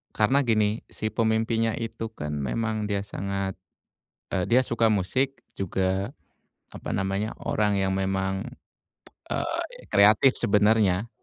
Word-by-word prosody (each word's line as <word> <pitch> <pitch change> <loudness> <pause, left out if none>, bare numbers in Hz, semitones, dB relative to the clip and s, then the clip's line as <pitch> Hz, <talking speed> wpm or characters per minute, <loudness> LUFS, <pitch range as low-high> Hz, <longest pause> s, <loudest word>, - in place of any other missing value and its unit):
karena 130 +6 +3
gini, 110 -1 +2
si 110 0 -4
pemimpinya 110 0 +1
itu 115 -1 -4
kan 75 -6 -4
memang 110 - -1
dia 100 -1 -1
sangat, 100 -1 -3 0.8
eee, 90 -2 +1
dia 125 +2 +6
suka 115 -1 +2
musik, 130 +8 0 0.2
juga, 95 +3 -1 0.6
apa - - -7
namanya, 95 +3 -1
orang 105 -2 +1
yang 95 0 +1
memang, 95 +1 -1 0.8
eee, - - -1 0.3
kreatif 105 +6 +6
sebenarnya. 105 -1 +3
105 Hz, 120 wpm, -26 LUFS, 95-110 Hz, 0.8 s, dia